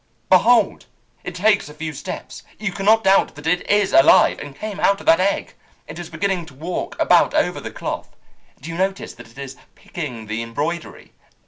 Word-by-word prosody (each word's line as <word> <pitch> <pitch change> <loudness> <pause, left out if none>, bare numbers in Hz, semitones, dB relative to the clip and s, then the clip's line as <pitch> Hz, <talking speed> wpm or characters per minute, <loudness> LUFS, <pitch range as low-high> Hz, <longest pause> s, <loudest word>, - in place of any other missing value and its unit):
"Behold, 215 +4 +4 0.4
it 180 - -7
takes 205 -3 +2
a 150 - -12
few 155 0 -5
steps! 140 - -7 0.2
You 215 0 -3
cannot 210 +4 +3
doubt 195 -5 +3
that 145 +1 -11
it 180 +2 0
is 205 -1 +2
alive, 135 - +6
and 145 -1 -9
came 210 +4 -6
out 200 0 +2
of - - -12
that 165 - +5
egg. 195 +2 0 0.3
It - - -9
is 175 -1 -7
beginning 175 +1 -2
to 140 - -15
walk 165 +6 -5
about - - +4
over - - +1
the - - -6
cloth. - - -6 0.4
Do 160 +5 -8
you 165 - -6
notice 195 +1 -2
that 120 -1 -14
it 115 - -21
is 135 -1 -8 0.2
picking 125 -10 -7
the 110 +2 -4
embroidery? 150 +9 -5
170 Hz, 195 wpm, -21 LUFS, 145-195 Hz, 0.4 s, alive